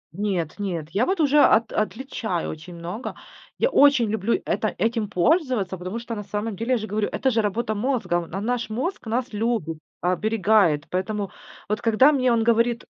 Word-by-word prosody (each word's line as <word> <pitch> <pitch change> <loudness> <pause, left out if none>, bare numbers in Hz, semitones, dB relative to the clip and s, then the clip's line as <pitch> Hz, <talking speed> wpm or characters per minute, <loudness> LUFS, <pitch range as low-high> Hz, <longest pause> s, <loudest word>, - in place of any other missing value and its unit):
Нет, 190 -4 -2
нет, 170 -6 -3
я 215 +7 +1
вот 380 -1 0
уже 295 0 +4
от 225 0 +4
отличаю 220 -5 -2
очень 160 +3 -10
много. 175 +8 -6 0.4
Я - - +2
очень 280 - +5
люблю 220 - 0
это - - 0
этим 225 -2 0
пользоваться, 250 - +1
потому 185 +5 -5
что, 235 0 -6
на 210 -2 -5
самом 205 +2 -3
деле, 230 +6 -3
я - - +3
же 215 - -4
говорю, 210 0 -1
это 265 - 0
же 225 -1 +2
работа 215 +2 -1
мозга. 205 -7 -1
На 190 - -5
наш 235 +2 -2
мозг 255 - -3
нас 240 +2 -2
любит, 210 -7 -1 0.2
оберегает. 195 -4 +2
Поэтому, 195 +2 -2 0.4
вот 210 +1 -2
когда 230 +6 +5
мне 255 -4 +2
он 230 -1 +2
говорит 235 +1 +2
220 Hz, 180 wpm, -24 LUFS, 190-240 Hz, 0.4 s, очень